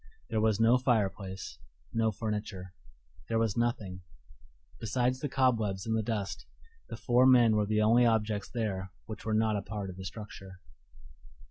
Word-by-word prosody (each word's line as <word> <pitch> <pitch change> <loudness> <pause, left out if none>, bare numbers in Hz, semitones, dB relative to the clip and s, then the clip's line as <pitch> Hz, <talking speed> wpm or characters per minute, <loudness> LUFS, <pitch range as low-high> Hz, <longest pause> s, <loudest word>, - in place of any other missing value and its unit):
There 110 - +1
was 110 -1 +2
no 115 +3 +5
fireplace, 100 - -1 0.3
no 115 -1 +2
furniture; 105 -4 -5 0.6
there 115 - +1
was 115 -3 +1
nothing: 110 -6 -1 0.8
besides 125 +3 0
the 145 - -3
cobwebs 110 -8 +1
and 110 0 0
the 110 - +1
dust, 105 -3 -4 0.4
the - - -6
four 125 +1 +4
men 120 -4 +6
were 105 -1 +1
the 110 0 +2
only 115 +3 +5
objects 105 -2 0
there 95 -5 -3 0.2
which 110 -1 -8
were 110 -1 0
not 110 -1 +2
a - - -2
part 100 -1 -5
of 90 - -12
the 95 - -7
structure. 95 -2 -9
110 Hz, 160 wpm, -30 LUFS, 100-115 Hz, 0.8 s, men